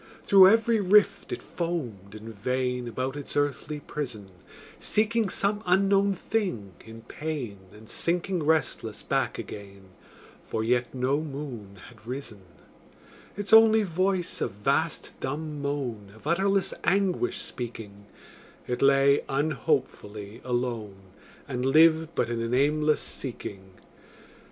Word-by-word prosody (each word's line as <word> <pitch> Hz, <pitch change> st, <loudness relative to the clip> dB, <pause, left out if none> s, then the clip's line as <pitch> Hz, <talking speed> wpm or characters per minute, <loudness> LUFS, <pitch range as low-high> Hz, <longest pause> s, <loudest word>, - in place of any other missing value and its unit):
Through 195 Hz, -2 st, +8 dB
every 225 Hz, +2 st, +4 dB
rift 205 Hz, +2 st, +3 dB
it -, -, -4 dB
foamed 120 Hz, -, -4 dB
in 110 Hz, +1 st, -9 dB
vain, 125 Hz, +3 st, -2 dB
About 130 Hz, +3 st, -3 dB
its 145 Hz, 0 st, -5 dB
earthly 145 Hz, +1 st, -1 dB
prison, 120 Hz, -11 st, -6 dB, 0.5 s
Seeking 220 Hz, 0 st, +1 dB
some 205 Hz, +2 st, -1 dB
unknown 195 Hz, +2 st, +3 dB
thing 175 Hz, -, -2 dB
in 115 Hz, 0 st, -12 dB
pain, 135 Hz, -9 st, -5 dB
And 105 Hz, +1 st, -15 dB
sinking 175 Hz, -, -1 dB
restless 160 Hz, +1 st, 0 dB
back -, -, 0 dB
again, 100 Hz, -2 st, -9 dB, 0.5 s
For 110 Hz, -, -3 dB
yet 120 Hz, +1 st, +1 dB
no 130 Hz, +4 st, +1 dB
moon 135 Hz, -9 st, -7 dB
had 110 Hz, -2 st, -18 dB
risen: 125 Hz, -5 st, -6 dB, 1.0 s
Its 205 Hz, +1 st, -3 dB
only 220 Hz, -1 st, +8 dB
voice 185 Hz, 0 st, -1 dB
a -, -, +2 dB
vast 105 Hz, -1 st, -1 dB
dumb 150 Hz, +2 st, -4 dB
moan, 125 Hz, -8 st, -3 dB
Of 110 Hz, -, -18 dB
utterless 195 Hz, +4 st, +1 dB
anguish 200 Hz, -, +1 dB
speaking, 105 Hz, -4 st, -7 dB, 0.6 s
It 125 Hz, -, -3 dB
lay 140 Hz, 0 st, +5 dB
unhopefully 115 Hz, -6 st, -2 dB
alone, 120 Hz, -5 st, -2 dB, 0.5 s
And 125 Hz, -3 st, -3 dB
lived 160 Hz, +4 st, +4 dB
but 120 Hz, -, +1 dB
in 120 Hz, -1 st, -2 dB
an 115 Hz, +2 st, -1 dB
aimless 150 Hz, +3 st, +2 dB
seeking. 95 Hz, -7 st, -6 dB
140 Hz, 120 wpm, -27 LUFS, 115-175 Hz, 1.0 s, Through